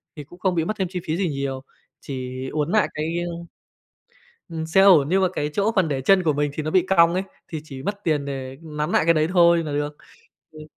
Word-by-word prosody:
thì 150 - -8
cũng 175 +6 -16
không 185 -2 0
bị 165 -1 0
mất 215 - -1
thêm 190 -3 -1
chi 180 - -3
phí 160 +1 -2
gì 185 -2 0
nhiều 135 -2 -4 0.4
chỉ 130 -1 -6
uốn 150 +2 -1
nại 215 -1 +3
cái, 150 - -2 0.2
ơ 170 - -5 1.2
Ừm, 160 -1 -4
xe 160 +4 +3
ổn 180 -8 +6
nhưng 190 +3 +2
mà 185 - +3
cái 150 - -2
chỗ 205 +7 +1
phần 185 -4 +3
để 140 -3 -2
chân 185 +8 +4
của 160 -3 +2
mình 145 0 -1
thì 155 - -3
nó 155 - -3
bị 185 +1 +2
cong 170 -2 +5
ấy 185 - 0 0.3
thì 160 -2 -5
chỉ 135 -4 -9
mất 200 +6 -4
tiền 150 -4 +1
để 135 -1 -6
nắn 150 -1 -4
nại - - +3
cái 165 +1 +4
đấy 155 0 +1
thôi 170 -2 +5
là 150 - -4
được. 145 0 -3 0.5
Ừm. 155 -1 -12
155 Hz, 250 wpm, -23 LUFS, 145-180 Hz, 1.2 s, ổn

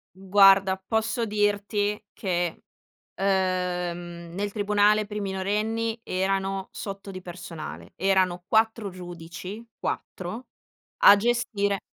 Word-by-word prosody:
Guarda, 195 0 +5
posso 220 +5 -1
dirti 205 0 0
che, 175 -3 -2 0.5
uhm, 180 -3 -1
nel 205 +2 -2
tribunale 210 0 +3
per 210 0 -6
i - - -1
minorenni 210 +4 -1
erano 195 -1 -1
sotto 195 -1 -6
di 185 -1 -7
personale, 170 -3 -8
erano 185 -2 +2
4 220 -1 +2
giudici, 180 +3 -8 0.2
4 215 +8 -4 0.6
a 205 - +10
gestire 205 -3 0
195 Hz, 100 wpm, -26 LUFS, 185-210 Hz, 0.6 s, a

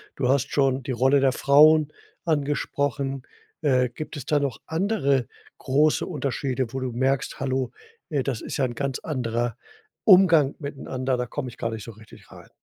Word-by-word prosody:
Du 130 - -1
hast 140 0 +1
schon 135 -2 +1
die 130 - -4
Rolle 130 +3 +3
der 135 -1 +4
Frauen 150 +3 +5 0.3
angesprochen. 140 -3 -1 0.4
Äh, 130 -5 +2
gibt 150 +5 -7
es 135 - -7
da 150 - +2
noch 135 -6 -2
andere 160 - 0 0.3
große 150 +3 +2
Unterschiede, 135 -5 -3
wo 135 - -2
du 130 -1 -2
merkst: 130 +3 -1
„Hallo, 130 -2 -1 0.4
äh, 145 -5 0
das 130 -5 -3
ist - - -5
ja 135 - +2
'n 120 -1 -5
ganz 140 0 -2
anderer 120 -5 -2 0.5
Umgang 175 - +6
miteinander, 130 -3 -3
da 125 - -2
komme 130 +2 -5
ich 120 - -14
gar 115 - -2
nicht 110 -2 -6
so 115 - -8
richtig 110 +1 -17
rein?“ - - -14
135 Hz, 175 wpm, -24 LUFS, 125-145 Hz, 0.5 s, Umgang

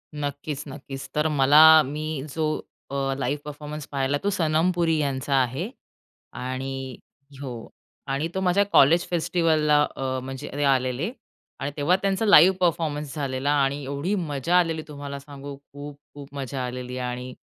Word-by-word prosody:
नक्कीच, 145 0 -4
नक्कीच. 135 -1 -8
तर 150 +1 +2
मला 145 +1 +6 0.2
मी 150 +1 -4
जो 160 - 0 0.5
अ, 135 -1 -1
लाईव्ह 140 +2 -1
परफॉर्मन्स 150 0 -7
पाहिला, 140 0 0
तो 200 - -1
सनम 160 +1 +2
पुरी 165 -2 +2
यांचा 140 -1 -1
आहे. 130 - -1 0.6
आणि 130 0 -5 0.4
हो. 120 -5 -7 0.4
आणि 140 +4 0
तो 190 - -1
माझ्या 190 +2 +3
कॉलेज 170 +6 +6
फेस्टिवलला 160 -3 +2 0.2
अ, 130 -1 -2
म्हणजे 130 0 -6
ते 145 - -1
आलेले 130 - +1 0.5
आणि 140 - -3
तेव्हा 150 +5 +3
त्यांचा 195 +2 0
लाईव्ह 190 -2 +7
परफॉर्मन्स 150 -4 0
झालेला. 140 -1 -1
आणि 140 +1 -1
एवढी 140 +9 -2
मजा 165 -2 0
आलेली 165 -2 0
तुम्हाला 140 -1 -7
सांगू 140 0 -9
खूप-खूप 145 0 -12
मजा 135 -1 -3
आलेली. 125 0 -5
आणि 125 0 -4
145 Hz, 145 wpm, -25 LUFS, 135-155 Hz, 0.6 s, लाईव्ह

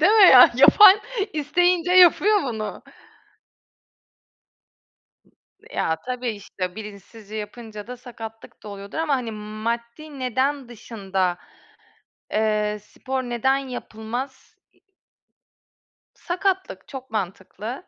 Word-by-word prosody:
değil 410 - +5
mi 440 - +6
ya? 250 -2 +9
Yapan 395 - +8 0.3
isteyince 350 +4 +1
yapıyor 370 +3 +5
bunu. 220 -5 -5 2.4
Iıı, - - -31 0.4
ya, 160 - 0
tabii, 250 -1 -3
işte, 185 -3 -6
bilinçsizce 210 0 -11
yapınca 215 0 -8
da 250 - -8
sakatlık 225 -3 -11
da - - -10
oluyordur. 200 +3 -9
Ama 320 -3 +1
hani, 240 -3 -4
maddi 235 +7 -6
neden 260 +1 -1
dışında, 195 -6 -3 1.0
eee, 210 -1 0
spor 260 +4 -5
neden 250 +2 0
yapılmaz? 250 0 -7 0.2
İii - - -33 1.3
Sakatlık, 380 +2 -3
çok 260 -2 -9
mantıklı. 215 - -5
240 Hz, 100 wpm, -23 LUFS, 215-280 Hz, 2.4 s, ya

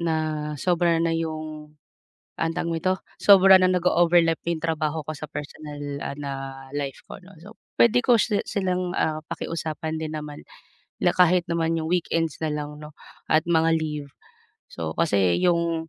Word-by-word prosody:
na 155 -2 -2
sobra 170 +1 +2
na 165 -1 +1
yung, 155 -2 -5 0.6
anong 165 0 -1
tawag 170 - -2
nito, 185 +3 +1 0.2
sobra 195 -1 +7
na 185 0 +4
nag-o-overlap 175 -2 +3
yung 170 -2 -2
trabaho 160 -1 -1
ko - - -1
sa 155 - -8
personal, 150 0 -7 0.2
ah, 140 - -5
na 140 - -4 0.5
life 140 -2 -4
ko, - - -8
'no? 190 +2 -16
So, 205 +6 -13 0.2
puwede 235 +1 +5
ko 240 -4 +5
si 210 -3 +1
silang, 185 -2 -2
ah, 155 0 -1
pakiusapan 160 -1 -4
din 155 -1 -4
naman, 150 -1 -8 0.6
la - - +2
kahit 180 -1 +4
naman 165 0 0
yung 160 - -3
weekends 165 -3 0
nalang, 150 -1 -3
'no 150 0 -10 0.4
at 155 0 +4
mga 165 -1 +3
leave. 150 -2 -4 0.6
So, 80 -1 -4
kasi 95 - +2
yung 170 -2 +1
165 Hz, 160 wpm, -24 LUFS, 155-175 Hz, 0.6 s, sobra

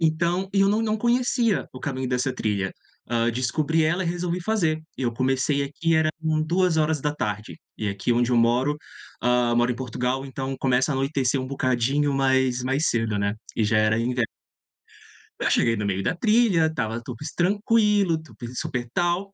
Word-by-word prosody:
Então, 170 +4 +1
eu 195 0 +4
não 215 +2 +2
não 215 -1 0
conhecia 240 -2 +1
o 130 - -8
caminho 130 -3 -3
dessa 125 +1 0
trilha, 100 -5 -1 0.4
hã, 115 0 +1
descobri 150 +6 0
ela 175 +4 +1
e - - -2
resolvi 175 +1 -2
fazer. 170 -7 0 0.2
Eu 120 -3 -1
comecei 135 +3 +1
aqui, 160 +4 -1
era 160 0 +3
com 155 -1 0
2h 155 - 0 0.2
e 105 - -1
aqui 100 +4 -1
onde 120 +1 +1
eu - - +3
moro, 120 +5 +2 0.5
hã, 120 0 +2
moro 120 +1 +2
em - - -5
Portugal, 125 +1 -2
então 135 0 -4
começa 130 +2 +2
a - - -2
anoitecer 135 -1 0
um 130 - -4
bocadinho 135 +2 0
mais 130 -2 +2
mais 135 +5 +1
cedo, 115 -3 0
né, 100 0 0 0.2
e - - +1
já 110 +1 +2
era 110 +1 +3
inverno. 120 0 0 1.1
Eu - - +1
cheguei 115 - +3
no 105 -1 -3
meio 95 -1 -1
da 180 - 0
trilha, 210 -6 +3
estava 115 -7 -3
tudo 120 0 -7
es 150 - -5
tranquilo, 205 -2 +2
tu 155 - -16
pe 120 - -7
super 125 -4 -3
tal, 175 +3 0
135 Hz, 180 wpm, -24 LUFS, 120-170 Hz, 1.1 s, eu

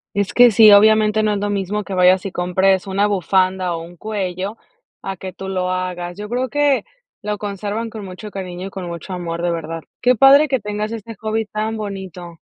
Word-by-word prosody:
Es 200 -2 -1
que 245 0 +7
sí, 215 0 +7
obviamente, 215 +1 +5
no 215 -1 +1
es 205 - -2
lo 205 0 -2
mismo 205 +1 -2
que 195 - -7
vayas 185 +1 +4
y 195 - -3
compres 190 +2 +1
una 200 +2 +1
bufanda, 185 -2 +1
o, 165 - -6
un 175 +1 -12
cuello 195 +1 -4 0.5
a 195 - -4
que 185 -1 -7
tú 190 0 -8
lo 185 -1 -2
hagas. 180 -1 -4
Yo 210 - -6
creo 250 +3 -2
que 290 -6 +2 0.4
lo 210 0 -3
conservan 210 +3 -4
con 215 -2 -8
mucho 190 +3 -9
cariño 185 -1 -6
y - - -7
con 185 -2 -6
mucho 170 +2 -7
amor, 170 -1 -4
de 175 - +1
verdad. 165 -1 -5 0.2
Qué 250 0 +4
padre 275 +5 +6
que 265 -2 0
tengas 210 +1 -4
este 230 0 -7
hobby 220 +1 -2
tan 215 +1 -3
bonito. 190 -5 -7
200 Hz, 210 wpm, -19 LUFS, 185-215 Hz, 0.5 s, que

